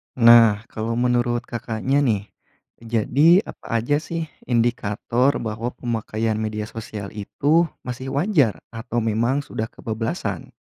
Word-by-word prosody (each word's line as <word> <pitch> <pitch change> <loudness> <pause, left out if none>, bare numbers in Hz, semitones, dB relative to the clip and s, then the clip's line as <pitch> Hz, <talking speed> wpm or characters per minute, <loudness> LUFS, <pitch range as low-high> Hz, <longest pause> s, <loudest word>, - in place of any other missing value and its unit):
Nah, 115 -3 +7
kalau 115 +1 -3
menurut 120 0 +1
Kakaknya, 120 +3 -1
nih, 105 -7 0 0.5
jadi 135 - +4
apa - - -12 0.2
aja 145 +6 +1
sih 165 0 -5 0.2
indikator 120 +1 +1
bahwa 115 +2 -3
pemakaian 110 -2 -2
media 110 -1 -2
sosial 105 -3 -7
itu 145 +11 +1 0.2
masih 130 +2 -5
wajar, 145 - +2
atau 120 +1 -3
memang 115 +5 +1
sudah 110 -4 -4
kebablasan? 115 0 -4
115 Hz, 120 wpm, -22 LUFS, 110-130 Hz, 0.5 s, Nah